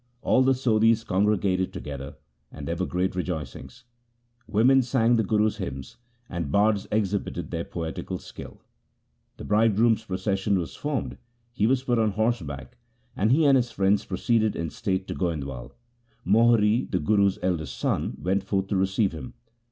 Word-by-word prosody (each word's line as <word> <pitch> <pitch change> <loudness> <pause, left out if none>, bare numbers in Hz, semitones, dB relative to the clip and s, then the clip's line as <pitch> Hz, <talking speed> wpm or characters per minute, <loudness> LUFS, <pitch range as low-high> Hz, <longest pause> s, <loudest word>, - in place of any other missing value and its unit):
All 130 - +3
the 130 0 +4
Sodhis 115 -2 +3
congregated 95 -1 +1
together, 70 +1 -7 0.4
and 70 -1 -8
there 85 - -1
were 95 +2 -2
great 90 +1 -1
rejoicings. 90 - -5 0.6
Women 125 +5 +4
sang 120 -1 +2
the 115 - +3
Guru's 105 +1 +1
hymns, 70 -9 -6 0.3
and 85 -5 -4
bards 105 +1 +2
exhibited 105 -2 -2
their 85 -1 -3
poetical 80 -2 -5
skill. - - -11 0.7
The - - -9
bridegroom's 110 +1 +3
procession 95 +1 -1
was 85 -3 -4
formed, 145 -3 -3 0.3
he 110 -3 +1
was 130 +1 +1
put 120 -3 +1
on 110 -2 +1
horseback, 85 - -2 0.4
and 105 +4 +1
he 155 +4 +4
and 140 -1 +6
his 125 -2 +2
friends 100 -1 +1
proceeded 110 +3 0
in 85 -2 -3
state 95 -4 -2
to - - -3
Goindwal. 70 -8 -4 0.5
Mohri, 110 +2 +3
the 90 - 0
Guru's 100 +4 +2
eldest 85 -7 -2
son, - - -1
went 95 +5 0
forth 95 0 -1
to 100 - 0
receive 95 +2 +1
him. 80 -6 -9
100 Hz, 155 wpm, -26 LUFS, 90-115 Hz, 0.7 s, and